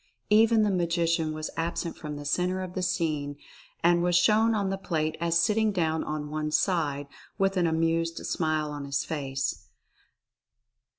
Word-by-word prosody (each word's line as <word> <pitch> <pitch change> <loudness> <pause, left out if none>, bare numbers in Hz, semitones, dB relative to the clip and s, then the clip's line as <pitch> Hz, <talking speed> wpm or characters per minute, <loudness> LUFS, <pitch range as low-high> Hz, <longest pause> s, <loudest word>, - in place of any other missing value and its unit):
Even 220 +1 +5
the 210 - +2
Magician 170 -3 +1
was 155 0 -5
absent 165 0 -2
from 150 -1 -6
the 145 0 -7
center 180 +5 0
of 180 -1 -7
the 185 - -2
scene 155 -6 -1 0.5
and 170 0 +4
was 175 0 +2
shown 220 +5 +4
on 200 -2 0
the 195 - -1
plate 155 -4 -1
as 170 0 +2
sitting 215 +3 +2
down 160 -4 0
on 150 -1 -4
one 155 0 -2
side, 150 -4 0 0.3
with 195 0 +1
an 175 -2 +2
amused 165 +1 0
smile 155 -2 -1
on 145 -1 -5
his 140 0 -1
face. 135 -3 -3
165 Hz, 165 wpm, -27 LUFS, 155-185 Hz, 0.5 s, Even